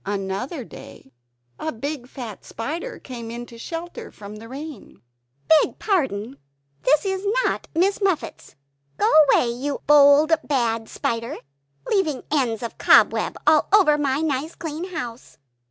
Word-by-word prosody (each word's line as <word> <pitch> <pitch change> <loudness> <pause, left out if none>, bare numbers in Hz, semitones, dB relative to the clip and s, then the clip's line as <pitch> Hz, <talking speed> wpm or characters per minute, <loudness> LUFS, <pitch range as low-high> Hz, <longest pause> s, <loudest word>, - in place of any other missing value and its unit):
Another 205 - -3
day, 135 - -13 0.5
a 315 - -2
big 270 +2 -5
fat 240 -6 -8
spider 330 - -5
came 235 -3 -8
in 240 +1 -6
to 235 -1 -14
shelter 335 +7 -7
from 210 0 -10
the 225 +1 -11
rain. 275 - -9 0.5
"Beg 315 -1 +4
pardon, 265 - -1 0.5
is 300 - +5
this 385 -1 -2 0.2
not - - -1
Miss 390 +5 +2
Muffet's?" 385 -5 -2 0.4
"Go - - +2 0.2
away, 240 - +3
you 275 +4 -4
bold 295 +2 +6
bad 230 -5 -1
spider! 230 0 -3 0.5
Leaving 320 -10 0
ends 245 -7 0
of 235 - -6
cobweb - - +4
all 305 0 +4
over 385 -7 +6
my 285 -1 0
nice 305 +1 -2
clean 325 0 -5
house!" 255 -10 -7
280 Hz, 140 wpm, -23 LUFS, 235-320 Hz, 0.5 s, bold